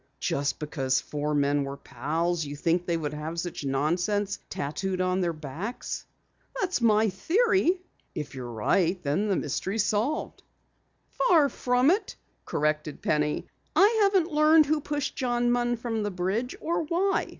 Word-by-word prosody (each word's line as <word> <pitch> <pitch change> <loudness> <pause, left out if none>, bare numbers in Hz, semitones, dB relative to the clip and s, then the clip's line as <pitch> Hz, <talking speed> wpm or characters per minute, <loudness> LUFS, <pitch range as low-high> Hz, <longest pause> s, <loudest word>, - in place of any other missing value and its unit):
"Just 140 -1 -1
because 135 -4 0
four 150 +2 -3
men 145 0 +2
were 140 0 -5
pals, 165 +4 -2
you 145 0 -6
think 170 +4 0
they 170 -1 +1
would 150 -2 -3
have 155 +3 -4
such 175 -3 -4
nonsense 175 +9 0
tattooed 185 +6 -3
on 185 0 +1
their 175 -1 +1
backs?" 165 - -6 0.5
"That's 370 -8 0
my 220 -1 +4
theory." 375 - +2 0.4
"If 150 -2 -5
you're 125 -2 -6
right, 170 - +1
then 150 +9 0
the 200 - +2
mystery 180 +6 -2
is 220 - +2
solved." 220 +10 -1 0.7
"Far 320 - +4
from 250 +4 +2
it," 405 +5 -1 0.3
corrected 150 0 -1
Penny. 150 0 0 0.3
"I 440 +3 +5
haven't 385 -4 +3
learned 305 +1 +6
who 300 +1 +1
pushed 290 -1 -3
John 240 -1 +1
Munn 240 0 +1
from 225 -1 -2
the 205 - -1
bridge 195 +7 -2
or 335 +1 -1
why. 355 +5 0
190 Hz, 155 wpm, -27 LUFS, -, 0.7 s, learned